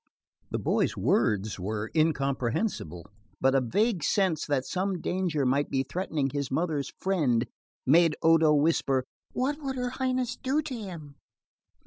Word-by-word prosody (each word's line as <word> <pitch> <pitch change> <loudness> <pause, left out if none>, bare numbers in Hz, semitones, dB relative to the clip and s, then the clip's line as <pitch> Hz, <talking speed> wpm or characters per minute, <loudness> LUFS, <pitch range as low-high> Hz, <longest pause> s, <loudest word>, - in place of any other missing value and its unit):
The - - -2
boy's - - 0
words 105 -1 +1
were 105 +3 -3
incomprehensible, 135 - 0 0.3
but 135 - +3
the 135 0 +3
vague 195 - +1
sense 190 -6 +1
that 140 -3 0
some 185 +4 -2
danger 175 -6 -1
might 140 +3 +1
be 135 -1 0
threatening 150 -4 -2
his 140 -2 -2
mother's 155 -1 -1
friend 145 -12 +1 0.4
made 160 +3 +5
Odo 160 -1 +5
whisper: 145 -4 +2 0.3
"What 285 +4 -1
would 270 -2 -3
her 250 -1 -2
Highness 255 -1 -1
do 275 +4 0
to 295 -3 -5
him?" 170 - -8
155 Hz, 140 wpm, -28 LUFS, 135-195 Hz, 0.4 s, made